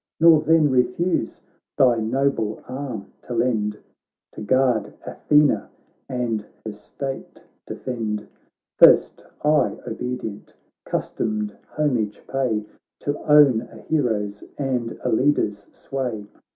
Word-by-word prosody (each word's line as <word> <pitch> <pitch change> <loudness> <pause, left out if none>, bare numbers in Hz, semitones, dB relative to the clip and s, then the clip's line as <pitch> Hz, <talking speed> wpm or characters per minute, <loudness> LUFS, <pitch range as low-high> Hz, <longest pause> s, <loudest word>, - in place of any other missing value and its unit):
Nor 160 -1 +7
then 155 -2 +4
refuse 130 +8 0 0.4
thy 125 -3 +5
noble 115 -2 -1
arm 125 -6 -6
to 120 - -6
lend 105 -4 0 0.5
To - - -9
guard 115 -2 +1
Athena, 150 -1 +2 0.4
and 120 -4 -2 0.2
her 110 - -4
state 135 +6 -7 0.2
defend. 110 -4 -4 0.5
First - - +6 0.2
I, 150 0 +3
obedient, 125 -5 -5 0.3
'customed 105 -1 -2 0.2
homage 120 -9 0
pay 125 -6 -1 0.4
To 145 +1 -2
own 140 -6 +7
a 120 - -13
hero's 110 -7 -1
and 125 -5 -2
a - - 0
leader's 110 -5 +1
sway.' 125 -6 -4
125 Hz, 105 wpm, -23 LUFS, 105-140 Hz, 0.5 s, Nor